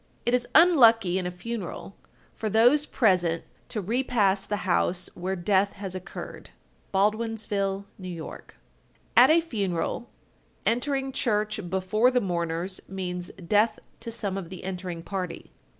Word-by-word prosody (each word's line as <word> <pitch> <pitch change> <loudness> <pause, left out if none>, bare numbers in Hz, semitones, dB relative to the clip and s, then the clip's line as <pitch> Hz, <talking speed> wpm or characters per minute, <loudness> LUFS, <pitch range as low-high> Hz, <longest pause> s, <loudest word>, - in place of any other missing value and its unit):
It 240 - +1
is 245 -1 +2
unlucky 230 - +6
in 180 - -2
a - - -1
funeral, 195 +1 -6 0.4
for 220 - -3
those 245 +8 +4
present 180 -7 +2 0.3
to 215 - -3
repass 205 -3 +1
the 205 -3 -3
house 180 0 +1
where 185 +2 -3
death 195 +2 +2
has 195 -2 -6
occurred. 185 -1 -8 0.4
Baldwinsville, 205 -1 0 0.2
N.Y. 180 -2 -5
1256. - - -11 0.6
At - - +8
a 330 +2 +6
funeral, 200 - -2 0.6
entering 270 +3 0
church 215 -6 -1
before 190 +6 +2
the 250 -1 +2
mourners 175 -1 -2
means 180 -2 -4
death 205 +5 +1 0.2
to 230 0 -6
some 200 -4 -2
of 175 -4 -8
the 185 - -9
entering 180 -2 -5
party. 185 -3 -5
200 Hz, 135 wpm, -26 LUFS, 185-230 Hz, 0.6 s, At